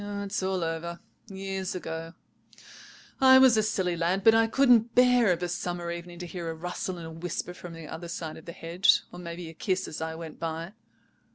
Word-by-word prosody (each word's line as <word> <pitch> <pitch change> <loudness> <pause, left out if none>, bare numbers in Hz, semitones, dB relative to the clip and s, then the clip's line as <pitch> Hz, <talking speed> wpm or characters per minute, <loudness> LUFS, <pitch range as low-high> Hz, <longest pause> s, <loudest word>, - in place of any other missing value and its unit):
It's 200 0 -3
all 190 -1 -1
over, 165 +1 -3 0.3
years 195 -2 -4
ago. 165 -1 -6 1.0
I 260 0 +8
was 260 -3 +7
a 215 - +4
silly 190 -5 0
lad; 175 +3 0
but 225 - +7
I 225 0 +4
couldn't 240 -2 +4
bear 250 -4 +5
of 175 0 -1
a - - 0
summer 175 0 -3
evening 170 0 -7
to 175 - -6
hear 170 -1 -5
a 165 - -4
rustle 180 +2 -4
and 170 - -7
a 160 - -7
whisper 175 +2 -4
from 180 -1 -10
the 165 -1 -9
other 170 +3 -7
side 165 -2 -5
of 160 - -13
the 170 - -6
hedge, 170 +4 +3
or 175 - -9
maybe 170 0 -7
a 160 - -9
kiss 185 +3 -1
as 155 - -7
I 160 0 -3
went 160 -1 -9
by. 165 +3 -4
175 Hz, 210 wpm, -28 LUFS, 165-195 Hz, 1.0 s, I